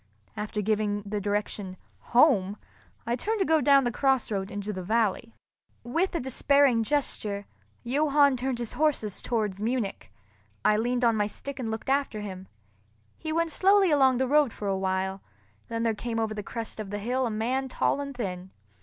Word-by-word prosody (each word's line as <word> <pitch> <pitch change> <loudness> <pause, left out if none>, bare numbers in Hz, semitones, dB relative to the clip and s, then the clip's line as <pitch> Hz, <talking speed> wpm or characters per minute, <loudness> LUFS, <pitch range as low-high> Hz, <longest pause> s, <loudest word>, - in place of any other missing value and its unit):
After 210 0 -3
giving 205 -1 0
the 205 0 -3
direction, 205 -2 -3 0.2
"Home!" 215 -7 +3 0.5
I 235 - 0
turned 435 - -1
to 385 - +1
go 320 -1 +3
down 275 0 +5
the 240 - 0
cross 265 -1 +1
road 195 -1 -2
into 205 +1 -4
the 185 - -5
valley. 220 +3 0 0.5
With 335 +11 -1
a - - +1
despairing 265 -1 +3
gesture, 215 -6 -1 0.4
Johann 285 +2 +3
turned 255 0 -2
his 235 -2 -4
horses 285 -10 0
towards 210 -5 -2
Munich. 230 -2 -2 0.5
I 210 - +5
leaned 245 +3 +1
on 230 -1 +4
my 210 -1 +1
stick 275 +6 -7
and 235 -3 -3
looked 220 0 -5
after 270 -5 0
him. 190 -2 -7 0.7
He 315 - -4
went 330 +1 0
slowly 390 0 +4
along 265 -3 +4
the 260 +1 +1
road 290 -2 +4
for 205 - -5
a 195 - +1
while, 190 0 -1 0.5
then 230 0 -3
there 230 -1 +2
came 225 +1 -3
over 220 -1 -1
the 210 - -4
crest 225 +2 -6
of 210 -2 -5
the 205 - -3
hill 250 +5 -1
a - - -2
man 250 +5 -1
tall 285 - 0
and 280 -2 -6
thin. 185 -5 -4
230 Hz, 185 wpm, -27 LUFS, 205-270 Hz, 0.7 s, down